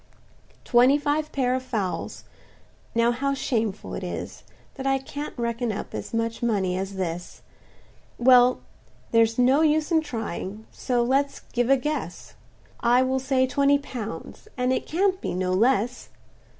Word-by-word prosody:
"Twenty 250 +4 +5
five 295 +1 -1
pair 255 -2 +1
of 260 - -1
fowls—now 230 +1 -4
how 275 +3 -1
shameful 225 -6 -2
it - - -5
is, - - -6 0.3
That 270 -1 -5
I 270 0 +3
can't 285 +2 -7
reckon 235 0 -1
up 205 - -6
as - - -5
much 230 0 -2
money 200 -6 0
as 195 +1 -4
this! 175 -2 -5 0.7
Well, 250 0 +5 0.5
there's 230 0 +3
no 260 +4 +4
use 310 +1 +2
in 320 -1 +4
trying; 220 - -5
so 245 -2 0
let's 275 +3 0
give 245 0 +1
a 275 - +6
guess; 300 +4 -4 0.5
I 245 +2 +4
will 260 +1 0
say 260 0 +2
twenty 280 +2 +3
pounds, 245 - -7
and 250 +1 +1
it - - -2
can't 375 +3 +1
be - - -3
no 185 0 0
less. 240 +3 +1
250 Hz, 150 wpm, -25 LUFS, 230-275 Hz, 0.7 s, a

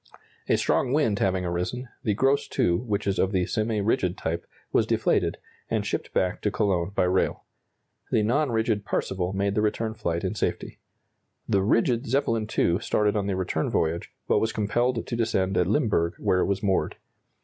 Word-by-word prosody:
A - - +4
strong 130 - +1
wind 115 -9 +2
having 95 -1 +1
arisen, 90 +9 -3 0.2
the 105 -3 +1
"Gross 135 +5 +2
II," - - +3
which 105 -1 -2
is 100 -1 0
of 95 - +2
the 90 -3 +1
semi 110 +1 -1
rigid 95 -3 +1
type, 80 +1 -3 0.2
was - - +2
deflated, - - +1 0.3
and - - 0
shipped - - -3
back 90 -1 0
to 105 - +1
Cologne 95 -4 0
by - - +3
rail. 90 +1 +1 0.7
The 110 - +3
non 140 +7 +2
rigid 110 -2 0
"Parseval" 95 -2 -2
made 100 +1 0
the 105 - +1
return 110 +1 0
flight 85 -5 -2
in - - -1
safety. - - -3 0.7
The 100 - +2
rigid 115 +4 +2
"Zeppelin 115 -4 0
II" 85 +2 +3
started 105 -1 +1
on 100 -2 0
the 100 - 0
return 95 -1 -1
voyage, 80 +1 -1 0.2
but - - +3
was 110 - 0
compelled 115 +3 0
to 120 - -3
descend 100 -5 0
at 90 -1 +2
Limburg, 105 - +1
where 90 - +1
it - - +2
was 100 +1 -1
moored. 95 -2 +1
105 Hz, 185 wpm, -26 LUFS, 95-115 Hz, 0.7 s, A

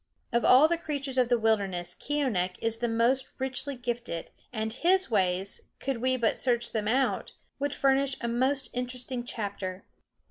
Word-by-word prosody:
Of 235 - +2
all 265 +5 +7
the 340 0 0
creatures 280 -5 -2
of 245 -2 +3
the 240 - +4
wilderness 195 -6 0
Keeonekh 230 -12 -1
is 225 0 0
the 240 - 0
most 240 +4 +2
richly 265 +1 -2
gifted, 240 -8 -4 0.2
and 220 -2 -2
his 365 +3 +2
ways, 190 -1 0
could 270 -2 -2
we 255 0 +2
but 230 -3 +1
search 240 -2 +1
them 215 -2 -2
out, 260 +4 +1 0.3
would 285 0 -1
furnish 275 0 +3
a 235 - -3
most 260 +2 0
interesting 250 0 -3
chapter. 200 -5 -4
245 Hz, 165 wpm, -28 LUFS, 220-265 Hz, 0.3 s, all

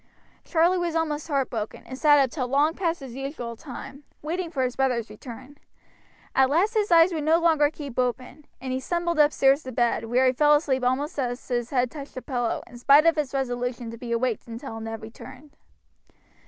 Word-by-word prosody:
Charlie 345 +2 +2
was 340 -2 -2
almost 310 -2 -1
heartbroken, 255 -7 -2
and 260 - -7
sat 295 +2 +5
up 270 -3 +3
till 255 -6 -3
long 285 +5 +2
past 340 -3 -2
his 265 -3 -8
usual 265 -3 -5
time, 270 +3 -10 0.2
waiting 340 +3 -3
for 275 -6 -1
his 250 -1 -2
brother's 245 -5 0
return. 255 +6 -11 0.7
At 265 0 +4
last 360 +10 +2
his 425 -4 0
eyes 335 +1 +6
would 310 -2 -2
no 320 +2 +4
longer 320 -4 +3
keep 285 -5 -7
open, 255 +4 -3
and 260 0 -4
he 260 - -1
stumbled 340 +3 -2
upstairs 285 -1 +4
to 260 - -8
bed, 235 -2 0
where 245 +3 +2
he 255 - +4
fell 295 +3 +5
asleep 270 -4 0
almost 275 +4 -1
as 245 -1 -3
his 240 -2 -2
head 250 -3 0
touched 290 -3 -9
the 255 - -6
pillow, 245 -3 -2
in 240 0 -13
spite 280 +5 +6
of 330 - +5
his 300 -4 -2
resolution 245 -3 -3
to 230 - -9
be 240 -1 -6
awake 235 -1 0
until 230 0 -7
Ned 225 0 -6
returned. 265 +6 -12
270 Hz, 200 wpm, -25 LUFS, 245-305 Hz, 0.7 s, eyes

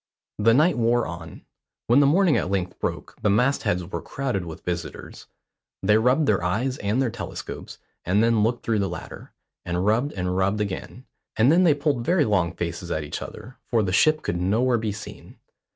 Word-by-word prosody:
The 115 +2 +4
night 155 0 +3
wore 120 +1 +2
on. 85 -1 -9 0.4
When 120 +4 +4
the 145 - +5
morning 175 +2 +4
at - - 0
length 95 -2 -2
broke - - -4
the 105 - +2
mast 125 +7 +2
heads 90 0 0
were 90 - -5
crowded 125 -10 -3
with 80 -2 -9
visitors. 90 -1 -6 0.6
They 105 +2 +4
rubbed 125 +7 +3
their 100 -8 +1
eyes 120 +9 -1
and 105 +5 0
their 130 -4 +1
telescopes, 120 - -7 0.3
and 100 +5 +2
then 115 -2 +3
looked 115 +3 0
through 110 -2 +1
the 100 -1 0
latter, 85 -1 -9 0.3
and 90 +2 -2
rubbed 115 +7 +1
and 90 -1 -2
rubbed 95 +3 +1
again; 105 +5 -5 0.3
and 115 +6 +5
then 180 +3 +5
they 155 -4 +5
pulled 140 -4 0
very 170 +2 +2
long 95 -7 +1
faces - - -4
at 80 - -2
each 75 - -5
other, 125 +2 -9
for 115 -3 +2
the 95 -2 -2
ship 155 +9 +3
could 85 +1 -2
nowhere 115 +6 +2
be 110 -1 -2
seen. 105 +1 -10
110 Hz, 200 wpm, -24 LUFS, 95-130 Hz, 0.6 s, the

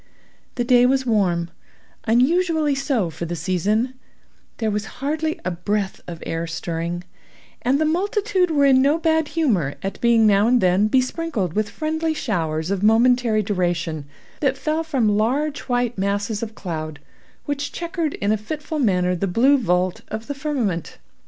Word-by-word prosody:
The 245 - 0
day 245 0 +5
was 265 0 +1
warm—unusually 245 - 0
so 270 - 0
for 170 - -5
the 170 +1 -4
season—there 215 +5 -3
was 210 +1 -2
hardly 310 +3 -2
a 185 - 0
breath 195 +3 -2
of 170 -2 -7
air 165 +1 -3
stirring; 170 +1 -4 0.6
and 265 +3 +2
the 315 - +2
multitude 375 +2 +1
were 290 -3 +3
in 265 -1 +5
no 285 +4 +3
bad 320 -2 +1
humor 195 - +1
at 195 - -4
being 235 -2 +4
now 205 0 +4
and 245 +1 +4
then 185 +1 +3
besprinkled 255 - 0
with 210 +1 0
friendly 315 0 -2
showers 165 - -2
of 195 -2 -1
momentary 225 0 +3
duration, 175 -6 -1 0.3
that 270 -2 +1
fell 310 +3 -1
from 245 -10 +1
large 280 +6 0
white 245 -3 0
masses 200 +2 -1
of 220 -1 -5
cloud 155 -5 -5 0.5
which 285 0 -3
chequered 340 -3 -3
in 200 +1 0
a 215 - +2
fitful 300 +8 -5
manner 180 -7 +2
the 195 +3 -1
blue 245 +10 +4
vault 180 -7 0
of 220 +1 -5
the 285 - -4
firmament. 265 - -2
225 Hz, 155 wpm, -22 LUFS, 185-285 Hz, 0.6 s, day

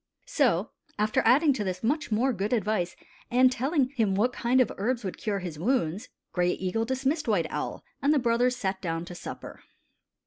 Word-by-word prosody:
So, 255 - +1 0.3
after 215 +1 +2
adding 280 +6 +5
to 230 -5 -2
this 185 0 -4
much 295 +3 0
more 245 +5 +2
good 205 +2 -2
advice 210 -6 0 0.3
and 255 +1 +5
telling 265 +2 +1
him 225 -8 0
what 240 +5 +2
kind 245 +2 +2
of 255 - +3
herbs 240 +3 -1
would 190 - -5
cure 210 -2 -1
his 170 -4 -6
wounds. 210 -1 0 0.2
Gray 180 0 +1
Eagle 190 +5 -1
dismissed 265 +5 -1
White 200 -7 +2
Owl, - - -4 0.2
and 280 - +3
the 305 - +4
brothers 245 0 +2
sat 190 -5 -3
down 165 -2 -3
to 180 - -8
supper. 175 - -8
225 Hz, 185 wpm, -27 LUFS, 190-260 Hz, 0.3 s, adding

